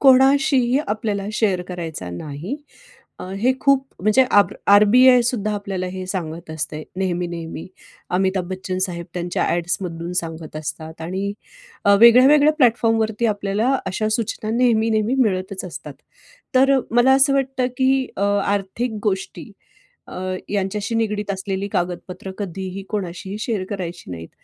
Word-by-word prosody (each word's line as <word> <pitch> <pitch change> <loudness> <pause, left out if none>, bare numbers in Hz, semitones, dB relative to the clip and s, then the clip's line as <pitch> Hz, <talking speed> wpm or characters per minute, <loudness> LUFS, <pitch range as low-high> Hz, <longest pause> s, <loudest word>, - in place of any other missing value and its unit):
कोणाशीही 270 -1 +5
आपल्याला 210 -2 -2
शेअर 195 -5 +1
करायचा 165 - -6
नाही. 150 - -6 0.6
अ, - - -7
हे 250 +5 +3
खूप 275 -1 +3 0.2
म्हणजे 215 +7 +4
आरब 205 0 +4 0.2
आरबीआयसुद्धा 235 0 +5
आपल्याला 195 -2 -4
हे 185 0 -6
सांगत 170 -3 -5
असते 155 -1 -4
नेहमी, 180 -2 -1
नेहमी. 165 -1 -6 0.4
अमिताभ 190 0 +1
बच्चन 185 0 -4
साहेब 170 -1 -6
त्यांच्या 175 0 -1
ॲड्स 175 +1 0
मधून 170 -1 -5
सांगत 160 -2 -8
असतात 160 +1 -7
आणि 190 +4 -3 0.7
वेगळ्या-वेगळ्या 270 +6 +7
प्लॅटफॉर्म 230 -3 +3
वरती 220 +1 0
आपल्याला 205 +3 0 0.2
अशा 215 +3 -1
सूचना 220 -1 -2
नेहमी, 230 -3 +3
नेहमी 220 +3 +1
मिळतच 190 -4 0
असतात. 150 -5 -8 0.6
तर 270 +1 +5
मला 240 +3 +5
असं 275 +1 +4
वाटतं, 265 -2 0
की 265 0 +2
अ, - - -3 0.2
आर्थिक 205 +4 -2
गोष्टी 195 +1 -3 0.6
अ, - - -10 0.4
यांच्याशी 205 +3 -2
निगडित 210 -2 -1
असलेली 195 0 -3
कागदपत्रं 180 +2 -3
कधीही 190 0 -5
कोणाशीही 190 0 -4
शेअर 215 -4 -2
करायची 180 - -6
नाहीत. 80 -1 -8
200 Hz, 135 wpm, -21 LUFS, 180-235 Hz, 0.7 s, वेगळ्या-वेगळ्या